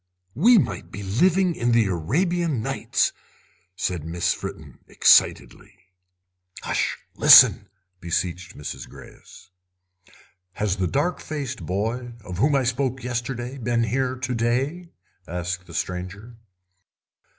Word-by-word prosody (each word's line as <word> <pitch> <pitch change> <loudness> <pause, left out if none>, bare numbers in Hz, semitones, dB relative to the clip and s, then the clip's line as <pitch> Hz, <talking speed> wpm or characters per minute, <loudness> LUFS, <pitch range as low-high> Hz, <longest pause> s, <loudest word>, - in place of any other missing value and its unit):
"We 225 - +5
might 95 - -1
be 100 +3 -8
living 175 - +2
in 120 -4 0
the 115 -2 +4
Arabian 145 - -1
Nights," - - 0 0.6
said 90 -4 -3
Miss 85 +2 -1
Fritten, - - -9
excitedly. - - +2 0.9
"Hush! - - -1 0.2
Listen," - - +7 0.3
beseeched 90 +1 -3
Mrs. 75 - -7
Greyes. 90 - -15 1.0
"Has 105 -1 -2
the 95 -1 0
dark 150 - -1
faced 130 - -6
boy, 115 +6 -3
of 90 -1 -7
whom 140 +5 +3
I 135 - +2
spoke 130 +1 -2
yesterday, 125 +1 -4
been 120 0 0
here 130 +3 -1
to 130 0 -4
day?" 130 +9 -1 0.4
asked 90 +1 -4
the 85 - -12
stranger. 95 +8 -5
120 Hz, 115 wpm, -23 LUFS, 90-135 Hz, 1.0 s, Listen